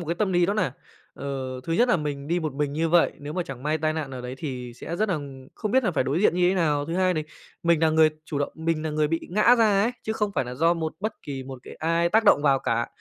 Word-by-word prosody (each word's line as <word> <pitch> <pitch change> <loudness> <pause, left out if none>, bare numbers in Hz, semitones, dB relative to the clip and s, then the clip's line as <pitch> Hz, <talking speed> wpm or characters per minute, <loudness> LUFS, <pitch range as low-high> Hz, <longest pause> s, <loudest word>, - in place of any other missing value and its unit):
một 170 - -7
cái 170 - -1
tâm 195 0 0
lý 175 -1 +3
nó 200 - 0
nà, 210 - 0 0.4
ờ, 130 -2 -5
thứ 165 - -2
nhất 240 +9 +3
là 245 - +4
mình 145 -2 -4
đi 175 +1 +1
một 155 -4 -3
mình 145 0 -1
như 160 +3 0
vậy, 170 +1 +4
nếu 145 +1 -7
mà 180 +2 -1
chẳng 130 -4 -8
may 155 +2 0
tai 155 0 0
nạn 155 -4 -4
ở 130 -1 -6
đấy 125 +1 -6
thì 125 -5 -5
sẽ 165 +7 -6
rất 215 +4 0
nà 185 - +1 0.4
không 215 -3 -3
biết 260 0 +3
là 190 - +2
phải 145 -6 0
đối 145 +8 0
diện 210 - +4
như 180 0 +3
thế 185 - +2
nào. 150 -5 +1
Thứ 165 - -3
hai 185 0 +2
đì 155 - -1 0.4
mình 170 -2 +3
là 160 - +5
người 155 0 +5
chủ 150 - -4
động, 145 - -2
mình 160 -1 -1
là 155 - -1
người 150 0 +1
bị 165 +1 0
ngã 215 +6 +5
ra 210 -3 +4
ấy, 235 +4 +1
chứ 220 - -2
không 210 -2 -1
phải 135 - +1
nà 125 +1 -6
do 165 +6 +3
một 160 -2 -3
bất 215 +1 -4
kỳ 135 -2 -5
một 130 0 -8
cái - - -10
ai 165 +1 +1
tác 220 +5 +3
động 145 -8 +5
vào 140 -2 +4
cả, 115 -2 0
160 Hz, 310 wpm, -25 LUFS, 145-180 Hz, 0.4 s, là